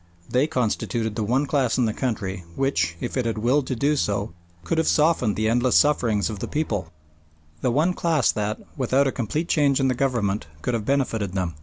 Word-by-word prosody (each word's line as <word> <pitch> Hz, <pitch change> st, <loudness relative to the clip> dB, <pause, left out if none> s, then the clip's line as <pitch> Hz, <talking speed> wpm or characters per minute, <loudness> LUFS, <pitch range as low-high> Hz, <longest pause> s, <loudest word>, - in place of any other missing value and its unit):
They 130 Hz, +4 st, +2 dB
constituted 115 Hz, -5 st, -1 dB
the 110 Hz, -, -1 dB
one 130 Hz, +7 st, +1 dB
class 135 Hz, -5 st, +1 dB
in 125 Hz, -, +3 dB
the 110 Hz, -, 0 dB
country 100 Hz, -7 st, -3 dB
which, 85 Hz, -12 st, 0 dB
if -, -, -4 dB
it 125 Hz, -3 st, 0 dB
had 115 Hz, -, -2 dB
willed 130 Hz, +5 st, +1 dB
to 130 Hz, -, -1 dB
do 145 Hz, +5 st, +1 dB
so, 100 Hz, -, -1 dB, 0.3 s
could 165 Hz, -, 0 dB
have 160 Hz, -, +1 dB
softened 150 Hz, -9 st, +2 dB
the 110 Hz, 0 st, 0 dB
endless 120 Hz, +2 st, +2 dB
sufferings 115 Hz, -9 st, +3 dB
of 105 Hz, -3 st, -5 dB
the -, -, -4 dB
people 115 Hz, -11 st, -2 dB, 0.7 s
the -, -, +1 dB
one 155 Hz, +9 st, +2 dB
class 160 Hz, -8 st, +2 dB
that, 105 Hz, 0 st, -2 dB, 0.2 s
without 135 Hz, +1 st, +2 dB
a 135 Hz, -, +1 dB
complete 140 Hz, +8 st, -2 dB
change 145 Hz, -5 st, +2 dB
in 135 Hz, -1 st, +2 dB
the -, -, +2 dB
government, 115 Hz, -, -1 dB, 0.2 s
could 125 Hz, -, -1 dB
have 110 Hz, -3 st, -2 dB
benefited 115 Hz, -8 st, 0 dB
them. 90 Hz, -3 st, -2 dB
125 Hz, 205 wpm, -24 LUFS, 105-140 Hz, 0.7 s, in